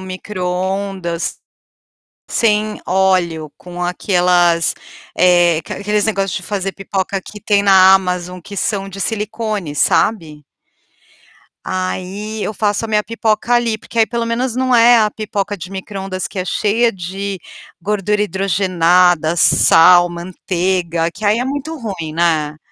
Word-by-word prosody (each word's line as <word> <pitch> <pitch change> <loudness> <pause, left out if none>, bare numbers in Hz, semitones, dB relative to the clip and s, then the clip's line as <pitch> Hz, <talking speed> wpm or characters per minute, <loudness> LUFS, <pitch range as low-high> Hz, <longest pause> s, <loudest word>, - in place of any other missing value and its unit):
microondas 185 -1 -3 0.9
sem 215 -1 0
óleo, 175 -5 +1
com 180 0 -10
aquelas, 175 -2 +2 0.4
eh, 175 -2 +4
aque 160 - -8
aqueles 210 +1 -1
negócio 195 -4 -1
de 185 - -5
fazer 195 -1 -3
pipoca 195 0 -3
que 210 - -11
tem 205 -1 +2
na 190 -1 +7
Amazon 180 -1 -2
que 200 +4 -10
são 195 -1 -2
de 195 0 -9
silicone, 210 -6 -3
sabe. 155 -3 0 1.2
Aí 190 +3 -4
eu 215 - -3
faço 210 +1 -1
a - - -13
minha 210 -1 +1
pipoca 225 +1 -1
ali, 235 -2 +1
porque 230 +1 -8
aí 220 - +5
pelo 235 0 -2
menos 235 +1 -2
não 255 -1 +1
é 240 +1 +6
a 215 -1 +2
pipoca 205 -1 -4
de 185 +1 -9
microondas 190 -1 -5
que - - -8
é 185 - -1
cheia 225 +5 +1
de 195 +1 -5 0.4
gordura 210 +2 0
hidrogenada, 180 -4 +2
sal, 175 +1 +6
manteiga, 175 -1 -2
que - - -14
aí 210 +2 +3
é 245 - -1
muito 285 +4 -4
ruim, 190 - -6
né. 155 -3 0
195 Hz, 135 wpm, -17 LUFS, 180-210 Hz, 1.2 s, na